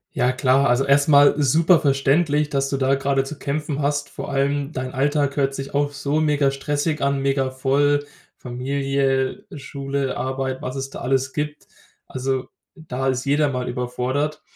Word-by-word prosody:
Ja, 125 +1 +2
klar. 130 +1 +3
Also, 125 +2 +2
erstmal 145 +1 +5
super 160 +5 +4
verständlich, 145 +1 +2
dass 135 -1 0
du 140 - -1
da 135 0 +2
gerade 135 0 +1
zu 140 +2 -8
kämpfen 145 0 -3
hast. 145 0 -1
Vor - - -7
allem 140 +1 0
dein 130 -2 -4
Alltag 140 +1 0
hört 135 -1 +1
sich 135 0 -6
auch 145 0 0
so 145 +1 -1
mega 145 -2 +2
stressig 145 +3 -2
an. 140 0 0
Mega 135 -1 +1
voll, 145 +2 +1 0.3
Familie, 135 - -1
Schule, 140 -1 -3
Arbeit, 130 0 -3
was 130 - -4
es 135 0 -4
da - - -8
alles 130 0 0
gibt. 150 0 -4 0.4
Also, 130 0 -2 0.3
da 135 -6 -5
ist 130 0 -1
jeder 145 +1 +2
mal 125 -2 -3
überfordert. 125 +4 -2
140 Hz, 165 wpm, -22 LUFS, 135-145 Hz, 0.4 s, erstmal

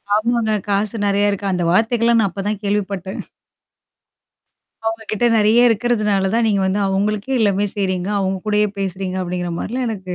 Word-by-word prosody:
ஆமாங்க. 230 0 +1 0.2
காசு 205 +2 0
நெறைய 200 +1 +2
இருக்கு. 200 0 -4
அந்த 180 -1 -1
வார்த்தைகள்லாம் 230 +3 +3
நான் 200 - +1
அப்பதான் 200 +2 -3
கேள்விப்பட்டேன். 195 -2 -2 1.7
அவங்க 225 0 -2
கிட்ட 215 +3 -1
நெறைய 220 +2 +4
இருக்கிறதுனால 210 -4 +1
தான் 235 - +2
நீங்க 200 -2 +2
வந்து 190 +2 0
அவங்களுக்கே 210 +6 -1
எல்லாமே 205 -2 +2
செய்றீங்க. 185 -2 -1
அவங்க 190 0 -1
கூடயே 210 0 +2
பேசுறீங்க 190 -1 -3
அப்டிங்கிற 180 0 -3
மாரிலாம் 250 +3 -3
எனக்கு. 185 -4 -5
205 Hz, 150 wpm, -19 LUFS, 190-220 Hz, 1.7 s, நெறைய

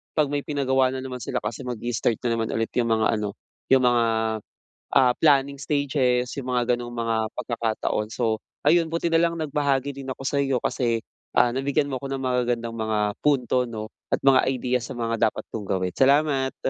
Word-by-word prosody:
'pag 150 -3 +2
may 145 -1 -2
pinagawa 130 -3 +1
nanaman 130 -1 -5
sila - - -3
kasi 110 +4 -5
mag-i-start 120 -1 -1
nanaman 115 -2 0
ulit 115 0 -1
'yung 120 - +1
mga 110 -1 +2
ano, 105 -1 -4 0.3
'yung 135 -1 +4
mga, 120 -1 +4 0.9
ah, 130 -2 +5
planning 140 -2 +4
stages, 135 -3 +1
yung 130 -2 -4
mga 125 0 +2
ganung 120 0 -7
mga 115 -1 -1
pagkakataon. 110 -3 -2
So, 110 -3 -1 0.2
ayun 165 +1 +4
buti 170 +1 0
nalang 165 0 +2
nagbahagi 140 -2 0
din 135 -1 -6
ako 135 - -7
sa'yo 140 -2 +1
kasi, 115 -3 0 0.4
ah, 120 - +5
nabigyan 140 +3 0
mo 130 - -2
ako 140 - -6
ng 135 - -5
magagandang 120 -2 0
mga 110 -1 -1 0.2
punto 130 -3 +2
'no 110 -2 -6 0.2
at - - +1
mga 135 -1 +6
idea 125 -1 0
sa 115 - -7
mga 115 -1 +1
dapat - - -8
kong 105 -3 -5
gawin, 95 -1 -1
salamat. 135 -1 +3
125 Hz, 175 wpm, -24 LUFS, 115-140 Hz, 0.9 s, mga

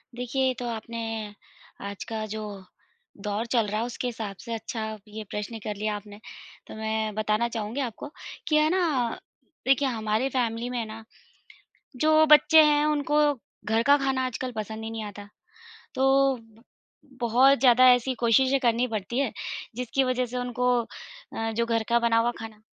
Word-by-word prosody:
देखिये, 250 +2 0
ये 260 - +1
तो 245 - -4
आपने 230 0 -5 0.9
आज 200 - -7
का 220 -1 -4
जो 215 0 -4 0.8
दौर 210 +2 -2
चल 230 -4 +2
रहा 210 +1 -1
है, 230 - -1
उसके 245 +1 -4
हिसाब 220 -4 -5
से 235 - -6
अच्छा 225 +1 -5 0.3
ये 215 +1 -7
प्रश्न 210 +2 -5
कर 210 - -3
लिया 210 +1 -2
आपने। 205 0 -10 0.5
तो - - -9
मैं 220 0 -2
बताना 215 +2 +1
चाहूँगी 225 +3 -3
आपको 250 +2 -5 0.4
कि 305 - +2
है 305 0 +4
ना, 315 -10 +1 0.5
देखिये 270 0 +3
हमारी 220 +2 0
फैमिली 240 -2 -1
में 245 -2 -2
ना, 220 +1 -9 0.9
जो 310 +4 +5
बच्चे 305 +1 +7
हैं 295 0 +4
उनको 295 0 +1 0.4
घर 225 +1 +1
का 285 +1 +7
खाना 265 -1 +1
आजकल 255 +1 -4
पसंद 220 +1 -5
ही 225 - -5
नहीं 225 -1 -5
आता। 205 0 -9 0.7
तो, 270 0 +3
ब 225 -1 -20 0.6
बहुत 250 +4 +5
ज़्यादा 255 0 +6
ऐसी 245 +1 0
कोशिशें 260 +3 +3
करनी 240 -1 +2
पड़ती 220 0 -4
है, 275 -5 0 0.4
जिसकी 250 +2 0
वज़ह 255 -1 0
से 250 +1 -6
उनको 250 0 -1 0.7
अ, 225 0 -2
जो 230 +1 0
घर 230 -1 0
का 235 0 +4
बना 235 -1 +2
हुआ 235 +1 +3
खाना 220 -1 -9
235 Hz, 170 wpm, -26 LUFS, 220-260 Hz, 0.9 s, बच्चे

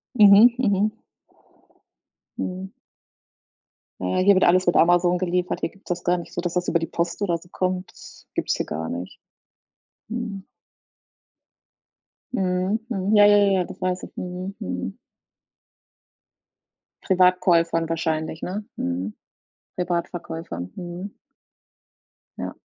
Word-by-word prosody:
Mhm, 210 0 +9
mhm. 210 -3 +2 1.5
Mhm. 185 +1 -4 1.3
Ja, 90 0 -1
hier 195 +2 +5
wird 185 - +3
alles 185 +1 +4
mit 175 - +3
Amazon 175 +1 +4
geliefert. 180 0 -1
Hier - - -1
gibt's 195 +2 -19
das 175 0 -2
gar 175 +1 +2
nicht 175 - -8
so, - - -2
dass 175 -1 -3
das 180 0 -1
über 170 - +2
die 165 - -2
Post 170 +4 -2
oder 175 -4 +1
so 170 +1 -18
kommt. 185 0 -2
Das - - -15
gibt's - - 0
hier - - -2
gar 80 +1 -4
nicht. 90 +2 -6 0.9
Mhm. 215 -4 -5 1.9
Mhm, 185 -1 0
mhm. 200 -2 0
Ja, 205 0 +8
ja, 205 0 +7
ja, 200 -1 +4
ja, - - +1
das 190 +1 -11
weiß 185 0 -1
ich. - - -8
Mhm, 180 +2 -5
mhm. 90 +1 -4 2.0
Privatkäufern 175 -3 +3
wahrscheinlich, 160 -1 -2
ne? 205 +3 -4
Mhm. 90 +4 -3 0.6
Privatverkäufer. 170 - -3
Mhm. 180 +3 -7 1.2
Ja. - - -5
180 Hz, 125 wpm, -24 LUFS, 170-195 Hz, 2.0 s, Mhm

